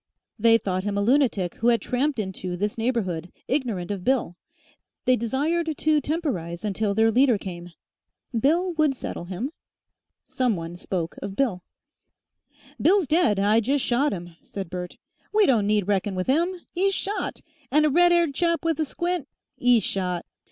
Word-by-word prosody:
They 230 Hz, +1 st, +6 dB
thought 185 Hz, -4 st, -2 dB
him 205 Hz, 0 st, -2 dB
a -, -, +1 dB
lunatic 235 Hz, -7 st, +2 dB
who 230 Hz, -, 0 dB
had 235 Hz, -1 st, +4 dB
tramped 270 Hz, +2 st, -1 dB
into, 190 Hz, -3 st, -4 dB
this 205 Hz, +3 st, -1 dB
neighbourhood 205 Hz, -8 st, -2 dB, 0.2 s
ignorant 230 Hz, -10 st, -1 dB
of 195 Hz, -3 st, -4 dB
Bill. 250 Hz, -8 st, +1 dB, 0.7 s
They 255 Hz, 0 st, +5 dB
desired 300 Hz, +9 st, 0 dB
to 305 Hz, -1 st, +2 dB
temporise 235 Hz, -, -3 dB
until 205 Hz, 0 st, -1 dB
their 225 Hz, +1 st, +4 dB
leader 250 Hz, 0 st, +4 dB
came. 175 Hz, -2 st, -8 dB, 0.6 s
Bill 335 Hz, +10 st, +2 dB
would 305 Hz, -4 st, +2 dB
settle 175 Hz, -, -6 dB
him. 195 Hz, +10 st, -4 dB, 0.8 s
Some 250 Hz, -4 st, 0 dB
one 165 Hz, 0 st, -6 dB
spoke 175 Hz, -2 st, -4 dB
of 195 Hz, -, -5 dB
Bill. 225 Hz, -9 st, 0 dB, 1.2 s
"Bill's 380 Hz, +2 st, +4 dB
dead, 295 Hz, -, +3 dB
I 210 Hz, +3 st, +4 dB
jest 270 Hz, +5 st, 0 dB
shot 260 Hz, +5 st, +2 dB
'im," 175 Hz, -3 st, -6 dB
said 195 Hz, -4 st, -7 dB
Bert. 180 Hz, -1 st, -6 dB, 0.3 s
"We 430 Hz, -1 st, +4 dB
don't 225 Hz, -, +3 dB
need 210 Hz, -2 st, +1 dB
reckon 200 Hz, -1 st, 0 dB
with 185 Hz, +4 st, -2 dB
'IM. 340 Hz, +6 st, +1 dB, 0.2 s
'e's 390 Hz, +2 st, +1 dB
shot, 410 Hz, +2 st, -3 dB, 0.3 s
and 305 Hz, +3 st, +4 dB
a -, -, +4 dB
red 350 Hz, +4 st, +5 dB
'aired 340 Hz, -4 st, +3 dB
chap 335 Hz, +2 st, 0 dB
with 325 Hz, -1 st, +1 dB
a 315 Hz, -, +2 dB
squint, 345 Hz, 0 st, -2 dB, 0.3 s
'E'S 245 Hz, -3 st, +4 dB
shot. 180 Hz, -3 st, -2 dB
230 Hz, 165 wpm, -25 LUFS, 190-300 Hz, 1.2 s, They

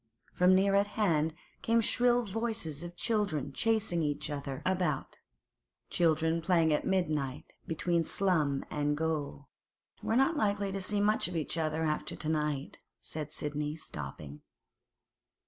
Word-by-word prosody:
From 180 Hz, +1 st, +5 dB
near 195 Hz, +1 st, +3 dB
at 200 Hz, +1 st, +4 dB
hand 160 Hz, -6 st, +2 dB, 0.3 s
came 230 Hz, 0 st, +3 dB
shrill 245 Hz, +2 st, +3 dB
voices 205 Hz, -8 st, -3 dB
of 175 Hz, 0 st, -7 dB
children 175 Hz, -, -1 dB
chasing 220 Hz, -3 st, +1 dB
each 150 Hz, 0 st, -2 dB
other 140 Hz, -2 st, -5 dB
about—children 165 Hz, -, -1 dB
playing 165 Hz, -3 st, +3 dB
at 150 Hz, -, 0 dB
midnight 155 Hz, -6 st, 0 dB, 0.2 s
between 170 Hz, 0 st, +1 dB
slum 155 Hz, -7 st, +1 dB
and 145 Hz, 0 st, 0 dB
gaol! 150 Hz, -3 st, -2 dB, 0.5 s
'We're 225 Hz, -, 0 dB
not 270 Hz, +6 st, +4 dB
likely 205 Hz, -6 st, 0 dB
to 195 Hz, 0 st, -3 dB
see 205 Hz, +2 st, +1 dB
much 210 Hz, -1 st, +2 dB
of 180 Hz, -, -6 dB
each 160 Hz, -1 st, -1 dB
other 160 Hz, -1 st, -1 dB
after 155 Hz, -1 st, -1 dB
to 155 Hz, -, -4 dB
night,' 150 Hz, -2 st, -1 dB, 0.2 s
said 150 Hz, -1 st, -6 dB
Sidney, 150 Hz, 0 st, -2 dB
stopping. 75 Hz, -, -8 dB
160 Hz, 135 wpm, -31 LUFS, 150-195 Hz, 0.5 s, From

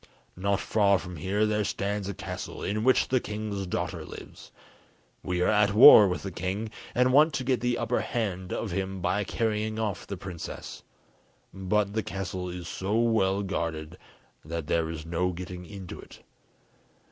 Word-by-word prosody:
Not 100 Hz, +2 st, 0 dB
far 100 Hz, -2 st, +3 dB
from 90 Hz, 0 st, -8 dB
here 100 Hz, +7 st, 0 dB
there 105 Hz, 0 st, +1 dB
stands 100 Hz, 0 st, -2 dB
a 100 Hz, -, -4 dB
castle, 95 Hz, -2 st, -6 dB
in 105 Hz, +2 st, -1 dB
which 130 Hz, +1 st, +3 dB
the 130 Hz, -, +3 dB
king's 105 Hz, -3 st, -4 dB
daughter -, -, -3 dB
lives; -, -, -11 dB, 0.7 s
we 90 Hz, -1 st, -2 dB
are -, -, +3 dB
at 105 Hz, -1 st, +3 dB
war 110 Hz, -3 st, +10 dB
with 90 Hz, -, -3 dB
the 95 Hz, -, -4 dB
king, 95 Hz, +5 st, -3 dB, 0.2 s
and 125 Hz, +1 st, +3 dB
want 150 Hz, +1 st, +5 dB
to 130 Hz, -, -1 dB
get 125 Hz, -3 st, 0 dB
the 125 Hz, 0 st, +1 dB
upper -, -, 0 dB
hand 95 Hz, -6 st, -3 dB
of 110 Hz, -, -3 dB
him 95 Hz, +1 st, -3 dB
by 105 Hz, +3 st, 0 dB
carrying 110 Hz, +1 st, -1 dB
off 110 Hz, -4 st, -3 dB
the 100 Hz, -, -5 dB
princess, 90 Hz, -2 st, -7 dB, 0.7 s
but 100 Hz, +1 st, 0 dB
the 110 Hz, -, 0 dB
castle 95 Hz, -2 st, -4 dB
is 90 Hz, -1 st, -6 dB
so 100 Hz, +5 st, -2 dB
well 100 Hz, -4 st, +2 dB
guarded 85 Hz, -3 st, -4 dB, 0.4 s
that 80 Hz, 0 st, -4 dB
there 80 Hz, +1 st, 0 dB
is 80 Hz, -1 st, -6 dB
no 90 Hz, +2 st, -1 dB
getting 90 Hz, 0 st, -7 dB
into 95 Hz, -3 st, -8 dB
it. -, -, -14 dB
100 Hz, 170 wpm, -28 LUFS, 90-105 Hz, 0.7 s, war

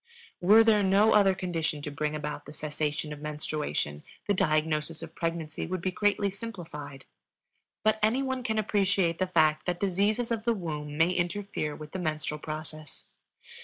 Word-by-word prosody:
Were 210 Hz, +5 st, +7 dB
there 220 Hz, -2 st, +5 dB
no 200 Hz, +3 st, +5 dB
other 195 Hz, -2 st, +5 dB
condition 165 Hz, -5 st, -2 dB
to 150 Hz, -, -4 dB
bring 150 Hz, +1 st, -2 dB
about 150 Hz, 0 st, -5 dB
the 145 Hz, -, -9 dB
cessation 150 Hz, 0 st, -3 dB
of 145 Hz, -, -10 dB
menstruation, 150 Hz, -, -3 dB, 0.2 s
the 205 Hz, -, +2 dB
diagnosis 155 Hz, -2 st, 0 dB
of -, -, -9 dB
pregnancy 165 Hz, -2 st, -3 dB
would 185 Hz, +2 st, -2 dB
be 185 Hz, -, 0 dB
greatly 205 Hz, 0 st, +1 dB
simplified. 170 Hz, -, -8 dB, 0.8 s
But 215 Hz, 0 st, +3 dB
any 230 Hz, +6 st, +3 dB
one 260 Hz, -1 st, -2 dB
can 220 Hz, -3 st, -1 dB
appreciate 195 Hz, -5 st, +1 dB
the 185 Hz, -, +1 dB
fact 155 Hz, -3 st, +3 dB
that 175 Hz, 0 st, -1 dB
diseases 205 Hz, +5 st, +1 dB
of 225 Hz, -2 st, -1 dB
the 235 Hz, 0 st, +2 dB
womb 150 Hz, -5 st, -5 dB
may 165 Hz, +3 st, +4 dB
interfere 175 Hz, -4 st, -2 dB
with 150 Hz, -1 st, -9 dB
the 190 Hz, -, -4 dB
menstrual 155 Hz, -2 st, -2 dB
process. 155 Hz, -, -7 dB
170 Hz, 165 wpm, -29 LUFS, 150-200 Hz, 0.8 s, Were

